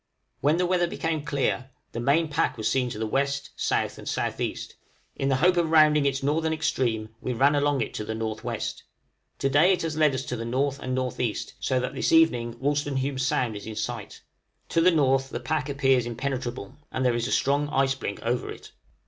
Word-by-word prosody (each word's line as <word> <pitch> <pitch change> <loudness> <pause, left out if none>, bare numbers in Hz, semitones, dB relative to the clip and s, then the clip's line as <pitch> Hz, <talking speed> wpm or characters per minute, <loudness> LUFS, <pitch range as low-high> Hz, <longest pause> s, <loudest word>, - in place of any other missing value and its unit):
When 150 +4 +2
the 180 - +2
weather 175 -1 +2
became 160 -3 -2
clear, 135 -2 -1 0.2
the 115 - -5
main 140 +7 +2
pack 150 -2 0
was 110 -1 -1
seen 130 -2 +1
to 115 - -6
the 110 - -2
W., 135 +6 +2
S., 140 0 -5 0.2
and - - -1
S.E.; - - -2 0.6
in 135 - -1
the 135 - +3
hope 180 +7 +3
of 170 -2 +2
rounding 155 -2 +5
its 135 0 -1
northern 160 +3 +1
extreme 120 -8 -1
we 125 - -2
ran 140 +5 +4
along 145 -2 +2
it - - -3
to - - -4
the 110 - -4
N.W. 110 -1 -2 1.0
To - - 0
day 155 +7 +5
it 180 - -2
has 160 -2 -2
led 150 -3 +4
us 130 - -2
to 125 - -3
the 115 - -5
N. 115 +2 -4
and 135 -1 -1
N.E., 125 -3 -1 0.2
so 130 -1 0
that 125 - -3
this - - 0
evening 125 -8 +4
Wolstenholme 140 -1 -1
Sound 125 -3 0
is 105 - -8
in 110 - -6
sight. 110 -1 -5 0.5
To 165 - +2
the 180 - +6
N. 135 -6 +3
the 120 - -4
pack 145 +3 -2
appears 135 -3 +2
impenetrable, 120 -3 -4
and 130 - -1
there 125 - +3
is 120 0 -1
a - - -4
strong 145 +2 +1
ice 135 -2 +2
blink 100 -6 -5
over 120 +1 -1
it. - - -10
135 Hz, 210 wpm, -26 LUFS, 120-150 Hz, 1.0 s, the